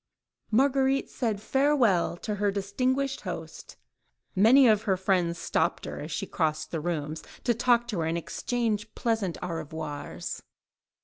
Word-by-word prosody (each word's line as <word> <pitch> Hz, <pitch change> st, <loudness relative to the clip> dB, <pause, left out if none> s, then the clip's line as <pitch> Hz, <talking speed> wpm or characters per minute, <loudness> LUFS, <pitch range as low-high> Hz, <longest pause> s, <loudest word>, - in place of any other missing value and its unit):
Marguerite 270 Hz, +3 st, +2 dB
said 225 Hz, -5 st, -1 dB
"Farewell" 240 Hz, -8 st, +2 dB
to 210 Hz, -2 st, -2 dB
her 205 Hz, -, +3 dB
distinguished 255 Hz, +8 st, -1 dB
host; -, -, -7 dB, 0.6 s
many 240 Hz, +7 st, +7 dB
of 215 Hz, -2 st, +4 dB
her 190 Hz, -, +3 dB
friends 180 Hz, -3 st, +1 dB
stopped -, -, 0 dB
her, -, -, -6 dB
as -, -, -6 dB
she -, -, -2 dB
crossed 155 Hz, -2 st, -1 dB
the 165 Hz, -, -2 dB
rooms, 155 Hz, -2 st, -3 dB, 0.2 s
to 240 Hz, -, +3 dB
talk 240 Hz, +1 st, +3 dB
to 205 Hz, -7 st, -2 dB
her, 160 Hz, -, 0 dB
and 165 Hz, +1 st, 0 dB
exchange 220 Hz, +3 st, -2 dB
pleasant 220 Hz, -7 st, -1 dB
au 180 Hz, -, -3 dB
revoirs. 155 Hz, -2 st, -5 dB
205 Hz, 145 wpm, -28 LUFS, 170-245 Hz, 0.6 s, many